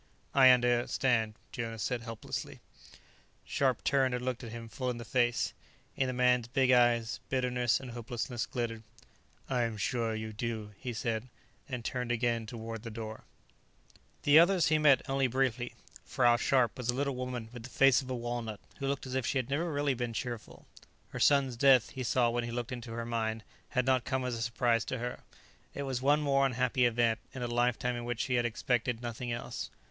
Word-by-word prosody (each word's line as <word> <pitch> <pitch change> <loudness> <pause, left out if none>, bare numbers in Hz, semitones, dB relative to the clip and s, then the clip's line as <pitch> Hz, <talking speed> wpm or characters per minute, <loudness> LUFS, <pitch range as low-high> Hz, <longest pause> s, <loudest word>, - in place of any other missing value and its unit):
"I 130 -2 +8
understand," 120 -2 +3 0.2
Jonas 115 -2 -4
said 125 -2 -1
helplessly. 115 -1 -6 0.9
Scharpe 130 -4 0
turned 135 -3 +2
and 125 0 -4
looked 130 -1 -2
him 115 -1 -7
full 125 +4 -3
in 125 - -3
the 120 - -7
face. 120 -2 +1 0.4
In 135 - +1
the 125 -1 +2
big 130 -2 +3
man's - - +6 0.3
eyes, - - -5
bitterness 125 -2 +1
and 130 -2 -8
hopelessness 120 0 -4
glittered. 115 -3 -3 0.7
"I 125 -2 0
am 115 -2 -1
sure 115 +1 -1
you 110 0 -5
do," 110 -1 -4
he 125 - -5
said, 115 +1 -3 0.4
and 125 -4 -5
turned 125 -1 -2
again 115 -1 0
toward 115 -1 -6
the 115 - -7
door. 110 -1 -7 1.0
The 145 +2 +7
others 175 0 +4
he 155 0 +3
met 145 -3 +4
only 135 0 +2
briefly. 125 -1 -1 0.3
Frau 120 -2 +3
Scharpe 125 -1 +2
was 125 -1 -3
a 120 - +2
little 140 0 -1
woman 125 -3 -4
with 120 - -8
the 125 - -9
face 135 0 +5
of 130 - -10
a 130 - -1
walnut, 120 -3 -4 0.2
who 135 - -2
looked 140 -1 -2
as 130 - -6
if 130 -3 0
she - - 0
had 130 0 -2
never 165 +4 0
really 145 -1 +1
been 120 -2 -3
cheerful. 120 -1 -6 0.4
Her - - -6
son's 140 -3 +4
death, 130 -1 +5
he 130 - -6
saw 120 -1 +2
when 120 0 -1
he - - -5
looked 120 +1 -4
into 120 -2 -6
her 115 0 -4
mind, 110 -1 -2 0.3
had 125 0 0
not 130 -2 +2
come 130 -1 -1
as 125 - -2
a 115 - -4
surprise 115 -1 +1
to 130 - -3
her; 120 +1 -4 0.6
it 140 - -3
was 130 -2 -2
one 145 +3 +4
more 140 -2 +3
unhappy 125 0 +1
event, 115 -1 +1 0.2
in 125 - -4
a - - -1
lifetime 120 +1 +1
in 120 - -4
which 120 -1 -2
she 130 - -1
had 120 -1 +2
expected 120 0 -1
nothing 120 +1 -4
else. 120 - -4
120 Hz, 200 wpm, -31 LUFS, 115-130 Hz, 1.0 s, I